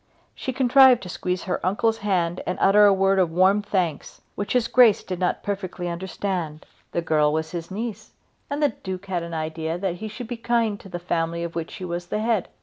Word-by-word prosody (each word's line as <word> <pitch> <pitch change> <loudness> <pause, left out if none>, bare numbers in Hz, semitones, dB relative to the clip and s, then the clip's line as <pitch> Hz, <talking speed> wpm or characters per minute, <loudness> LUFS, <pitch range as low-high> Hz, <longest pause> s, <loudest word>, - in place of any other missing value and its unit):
She 260 - -4
contrived 260 -1 +5
to 180 - -7
squeeze 180 0 -3
her 185 - -3
uncle's 220 +5 +1
hand 180 -4 0
and 185 - -1
to - - +2
utter 205 +2 +6
a - - +6
word 195 0 +3
of 180 -3 +3
warm 190 +5 +3
thanks, 180 -7 -2
which 205 - -3
his 245 -2 +2
grace 240 -5 +5
did 185 -2 -5
not 180 - -1
perfectly 190 -3 -4
understand. 175 -2 -4 0.3
The 170 - -1
girl 150 -2 +2
was 160 +1 -2
his 170 -2 -5
niece 215 +3 -6 0.4
and 285 +2 -2
the 290 - +5
Duke 190 -3 -7
had 185 -3 -2
an 170 0 -6
idea 160 +1 -3
that 180 -1 -2
he 220 - -6
should 220 +3 -7
be 240 0 -5
kind 230 -3 0
to 195 - -13
the 175 - -4
family 170 -1 -2
of 170 -1 -5
which 165 -1 -5
he 185 - -6
was 175 0 -4
the 210 - -2
head. 220 -3 0
185 Hz, 225 wpm, -24 LUFS, 170-210 Hz, 0.4 s, utter